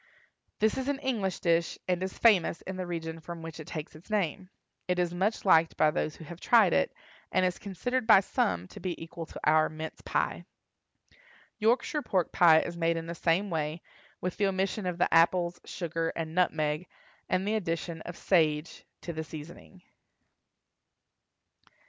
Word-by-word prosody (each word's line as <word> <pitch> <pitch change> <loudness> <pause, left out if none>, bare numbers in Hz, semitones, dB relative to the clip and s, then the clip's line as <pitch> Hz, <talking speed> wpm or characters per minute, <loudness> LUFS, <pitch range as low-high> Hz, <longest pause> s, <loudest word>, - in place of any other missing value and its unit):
This 220 +4 +1
is 260 - -3
an 285 - 0
English 230 -10 -2
dish, 170 -1 +1
and 180 -1 0
is 190 0 -4
famous 200 -7 +4
in 190 - -5
the 185 -1 -4
region 165 -1 -4
from 165 0 -8
which 165 0 -8
it 155 - -8
takes 155 -2 -6
its 160 +7 -15
name. 190 -3 -1 0.4
It 180 0 +1
is 175 -1 0
much 195 +6 -1
liked 165 -3 +4
by 155 - +4
those 155 -2 -2
who - - -11
have 170 +2 -10
tried 220 -5 +5
it, 80 - +2 0.4
and 185 - +3
is 180 0 -1
considered 220 +5 -2
by 215 -4 +8
some 90 - -1
to - - -11
be 175 -1 -4
equal 165 0 -7
to - - -9
our 155 +1 +4
mince 155 +1 -7
pie. - - -1 1.1
Yorkshire 240 +7 +2
pork 185 - 0
pie 165 -4 +6
is 170 - -5
made 165 0 +1
in 165 - -4
the 170 - -5
same 175 +4 +1
way, 155 0 -2 0.4
with 180 -1 -3
the 205 - +2
omission 195 +1 -1
of 180 -1 -2
the 175 - +1
apples, 170 +1 +3
sugar, 165 -2 -3
and 160 -1 -4
nutmeg, 155 -2 +1 0.4
and 185 +2 0
the 215 - +1
addition 170 -5 -2
of 175 +1 -8
sage 155 -3 +1 0.2
to 170 - -5
the 160 0 -4
seasoning. 160 +4 -11
175 Hz, 180 wpm, -29 LUFS, 160-190 Hz, 1.1 s, by